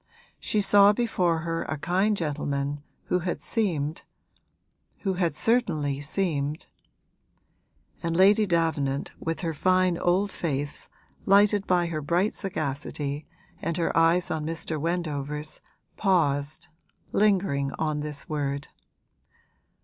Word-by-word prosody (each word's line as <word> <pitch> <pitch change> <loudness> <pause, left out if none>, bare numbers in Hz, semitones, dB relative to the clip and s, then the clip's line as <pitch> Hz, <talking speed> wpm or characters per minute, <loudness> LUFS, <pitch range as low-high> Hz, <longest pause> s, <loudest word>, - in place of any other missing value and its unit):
She 210 - 0
saw 200 0 +7
before 180 -8 +1
her 165 0 -2
a 155 - -3
kind 190 +8 +1
gentleman 145 -3 -2 0.2
who 180 - 0
had 175 0 -3
seemed 165 -8 -1 1.0
who 195 -2 0
had 175 -4 0
certainly 155 - +1
seemed 150 -2 -2 0.8
' - - -40
And 165 0 -1
Lady 205 +3 +5
Davenant, 155 -6 0
with 165 +2 -3
her 165 -2 -2
fine 185 +2 +2
old 190 +3 +2
face 145 -3 -3 0.4
lighted 205 0 +5
by 180 -1 +3
her 160 -2 -3
bright 175 +8 +1
sagacity 145 -4 -3 0.3
and 170 - -1
her 170 - 0
eyes 165 +2 +3
on 160 -1 -2
Mr. 160 -1 -3
Wendover's, 150 -3 -3 0.4
paused, 150 -7 +1 0.4
lingering 185 -10 +2
on 155 -2 -1
this 150 -1 -5
word. 140 -2 -3
165 Hz, 120 wpm, -26 LUFS, 145-185 Hz, 1.0 s, saw